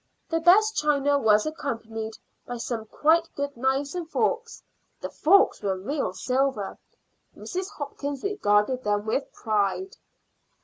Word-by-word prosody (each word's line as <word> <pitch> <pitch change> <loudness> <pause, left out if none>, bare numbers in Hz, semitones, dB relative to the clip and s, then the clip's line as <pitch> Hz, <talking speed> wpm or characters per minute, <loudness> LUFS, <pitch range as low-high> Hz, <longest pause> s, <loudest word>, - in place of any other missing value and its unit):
The 330 - +1
best 425 +6 +5
china 285 -1 +2
was 215 -4 +4
accompanied 225 -7 -4 0.3
by 245 - -4
some 230 -1 -4
quite 330 +7 +2
good 285 0 -3
knives 265 +3 0
and 350 -3 -5
forks. 465 +5 -1 0.4
The - - -6
forks 395 +6 +4
were 195 -2 -1
real 275 +10 -2
silver; 255 -5 -1 0.6
Mrs. 370 +1 -4
Hopkins 285 -1 -5
regarded 255 - +1
them 205 0 0
with 245 +6 -1
pride. 215 - -1
275 Hz, 130 wpm, -26 LUFS, 220-325 Hz, 0.6 s, best